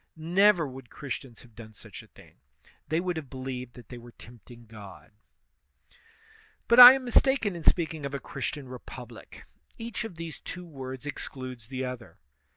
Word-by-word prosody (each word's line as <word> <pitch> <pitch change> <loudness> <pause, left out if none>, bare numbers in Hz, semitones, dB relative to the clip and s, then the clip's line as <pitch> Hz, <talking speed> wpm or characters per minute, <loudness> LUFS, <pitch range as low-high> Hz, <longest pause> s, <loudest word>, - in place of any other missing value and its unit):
Never 175 +1 +3
would 130 -2 -11
Christians 130 -4 -7
have 120 - -19
done 110 -1 -13
such - - -11
a - - -18
thing; - - -19 0.5
they 155 +2 0
would 180 -1 -2
have 145 -5 -7
believed 130 -2 -7
that 120 - -14
they 125 - -9
were 120 0 -14
tempting 120 0 -15
God. 105 -4 -13 1.6
But 235 +1 +5
I 250 +1 +14
am 265 -1 -3
mistaken 245 -4 +2
in 170 - -8
speaking 160 -3 +1
of 140 0 -4
a - - -3
Christian 140 -2 -5
repub 125 -1 -10
lie; 115 - -13 0.5
each 230 +1 -5
of 225 -6 -8
these 165 -2 -8
two 180 -1 -8
words 130 -4 -8
excludes 130 -5 -7
the 130 +1 -4
other. 125 -2 -8
135 Hz, 170 wpm, -28 LUFS, 125-170 Hz, 1.6 s, I